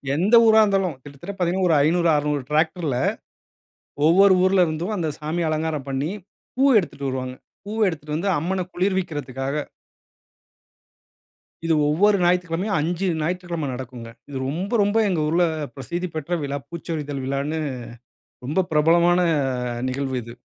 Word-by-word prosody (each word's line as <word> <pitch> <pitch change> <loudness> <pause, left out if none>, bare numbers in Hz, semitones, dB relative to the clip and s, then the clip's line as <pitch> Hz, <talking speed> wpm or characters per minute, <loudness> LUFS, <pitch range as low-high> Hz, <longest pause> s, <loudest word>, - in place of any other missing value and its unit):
எந்த 195 +9 +3
ஊரா 220 0 +6
இருந்தாலும், 195 -6 +1
கிட்டத்தட்ட 145 +8 -9
பார்த்தீங்கன்னா 180 0 +1
ஒரு 165 - +4
500, 170 +2 +2
600 150 -1 0
டிராக்டர்ல 155 -2 0 1.1
ஒவ்வொரு 190 +4 +6
ஊருல 185 -1 +4
இருந்தும், 165 +6 -3
அந்த 165 -3 -1
சாமி 155 +3 -2
அலங்காரம் 155 -3 -2
பண்ணி, 135 +5 -2 0.4
பூ 260 - +1 0.2
எடுத்துட்டு 140 -6 -5
வருவாங்க. 130 -1 -4 0.3
பூவ 215 +2 -4
எடுத்துட்டு 150 -3 -5
வந்து 180 +6 -1
அம்மன 185 +5 -1
குளிர்விக்றதுக்காக. 150 -8 -2 2.1
இது 165 - +2 0.2
ஒவ்வொரு 200 +7 +4
ஞாயிற்றுக்கெழமையும், 180 +3 +1
5 175 +4 -1 0.2
ஞாயிற்றுக்கெழமை 170 -1 -3
நடக்குங்க. 125 -2 -8 0.2
இது 140 - -5
ரொம்ப 175 +8 -3
ரொம்ப 205 +2 +1
எங்க 180 -4 0
ஊருல 170 +3 +3 0.3
பிரசித்தி 175 +7 -4
பெற்ற 160 +3 -2
விழா 140 0 -3
"பூச்சொரிதல்" 150 -5 -5
விழான்னு, 140 +4 -2 0.9
ரொம்ப 160 +8 0
பிரபலமான 170 +3 +4 0.7
நிகழ்வு 130 0 -3
இது. 120 +1 -11
165 Hz, 130 wpm, -23 LUFS, 145-180 Hz, 2.1 s, ஊரா